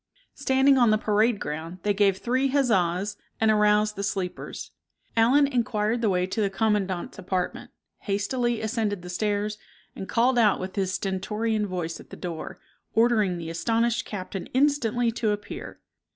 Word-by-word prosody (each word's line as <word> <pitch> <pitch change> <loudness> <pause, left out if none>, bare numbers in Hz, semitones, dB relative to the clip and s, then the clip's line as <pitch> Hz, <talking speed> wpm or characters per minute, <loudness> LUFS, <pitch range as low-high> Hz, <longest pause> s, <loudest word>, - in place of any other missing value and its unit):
Standing 265 0 +3
on 240 -2 +5
the 215 - +4
parade 215 +1 +2
ground 160 +4 -5
they 205 - +2
gave 200 -1 +3
three 255 +6 +1
huzzas 205 -7 +1 0.2
and 220 0 +4
aroused 210 0 +3
the 200 - -4
sleepers. 195 -3 -4 0.4
Allen 250 +6 +5
inquired 235 -3 0
the 220 - +2
way 180 -1 +1
to 205 +4 -2
the 200 - +2
commandant's 195 -2 -1
apartment, 185 -1 -3 0.3
hastily 230 +4 -1
ascended 220 -4 -1
the 180 - -7
stairs, 210 +2 -1 0.4
and 190 - -7
called 245 +2 +3
out 215 -3 +4
with 185 0 -6
his 190 -2 0
stentorian 210 +3 -1
voice 175 -3 -4
at - - -14
the - - -10
door, 170 -3 -6 0.4
ordering 220 -6 +3
the 165 -1 -5
astonished 230 +6 +1
captain 195 -1 -6
instantly 245 -4 +2
to 225 -1 -1
appear. 205 0 -5
210 Hz, 155 wpm, -26 LUFS, 190-235 Hz, 0.4 s, on